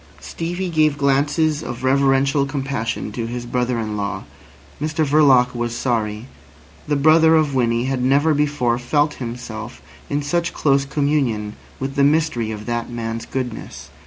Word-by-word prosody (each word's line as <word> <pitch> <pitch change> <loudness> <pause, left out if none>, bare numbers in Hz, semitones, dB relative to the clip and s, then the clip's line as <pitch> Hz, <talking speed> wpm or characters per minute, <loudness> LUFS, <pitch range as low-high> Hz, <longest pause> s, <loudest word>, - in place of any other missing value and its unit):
Stevie 175 +2 -4
gave 155 -2 +2
glances 145 +2 +1
of 120 -4 -6
reverential 135 +1 +2
compassion 135 -6 -3
to 115 +1 -4
his 120 +1 -5
brother 125 0 -1
in 110 -2 -3
law. 100 -1 -3 0.6
Mr 155 +1 0
Verloc 140 -4 +4
was 120 -1 -3
sorry. 110 -3 -1 0.6
The 145 - +1
brother 160 +3 +5
of 155 -3 +2
Winnie 120 -2 +1
had 130 -1 -1
never 140 +4 +3
before 145 -5 +1
felt 145 +5 +1
himself 115 -2 -6 0.3
in 145 0 -1
such 170 +4 -1
close 140 -1 +2
communion 135 -8 -1 0.2
with 135 +1 -3
the 140 - +2
mystery 145 -6 +2
of 105 -1 -6
that 120 -1 -3
man's 115 -1 -5
goodness. 125 -4 -6
135 Hz, 150 wpm, -20 LUFS, 120-145 Hz, 0.6 s, brother